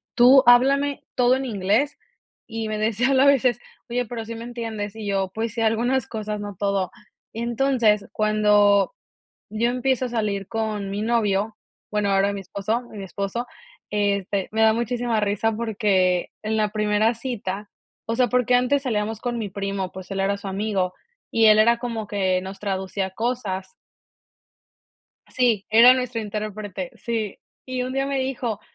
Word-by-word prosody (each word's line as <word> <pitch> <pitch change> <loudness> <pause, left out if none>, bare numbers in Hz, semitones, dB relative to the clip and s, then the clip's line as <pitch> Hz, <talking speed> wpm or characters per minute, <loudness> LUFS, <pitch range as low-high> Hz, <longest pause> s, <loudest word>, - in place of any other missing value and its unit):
tú 255 +2 +8
háblame 275 +4 +4
todo 250 0 +4
en 265 - -2
inglés", 225 +4 0 0.5
y 225 -1 -4
me 215 - -2
decía 220 +3 +1
a 270 0 +5
veces: 260 -3 +4 0.3
"Oye, 245 +1 -1
¿pero 230 0 -5
sí 230 +1 -7
me 230 +1 -7
entiendes?", 225 -4 -5
y 220 -1 -7
yo: 195 -1 0
"Pues 225 0 -3
sí, - - -5
algunas 230 +3 +1
cosas, 215 -1 -4
no 205 -1 -6
todo", 200 -2 0 0.4
entonces, 235 -3 +1
cuando 210 - +3 0.6
yo 220 +3 0
empiezo 255 0 0
a - - -5
salir 210 -4 -2
con 215 -3 -3
mi 200 +1 -3
novio, 215 -2 +1 0.4
bueno, 210 -1 +1
ahora 195 +1 +2
mi 200 - -5
esposo 200 +5 -2
mi 205 -2 -7
esposo, 200 +5 -4 0.4
este, 200 -2 0
me 220 +1 +1
da 220 0 +6
muchísima 235 0 -1
risa 210 +2 0
porque 200 -5 +1
en 220 +1 -1
la 210 -1 +1
primera 215 +2 +1
cita 210 -5 -5 0.4
o 230 - -2
sea, 250 0 +4
porque 250 0 +2
antes 250 +3 +2
salíamos 220 -4 -2
con 240 -1 -2
mi 215 -3 -3
primo, 195 -1 -3
pues 190 0 -10
él 195 - -3
era 195 +1 +1
su 200 0 -7
amigo, 195 -2 -1 0.4
y 225 -1 +4
él 215 0 +7
era 235 +2 +4
como 230 -3 -4
que 190 -3 0
nos 190 +1 -8
traducía 190 -1 -2
cosas. 195 -4 -3 1.5
Sí, 235 -6 +1
era 230 +3 +8
nuestro 250 -2 -2
intérprete, 210 -3 -5
sí, 225 -4 -3 0.3
y 255 -1 -2
un 255 +1 -4
día 270 +1 0
me 275 -1 -1
dijo: 250 -5 -2
215 Hz, 165 wpm, -23 LUFS, 200-240 Hz, 1.5 s, tú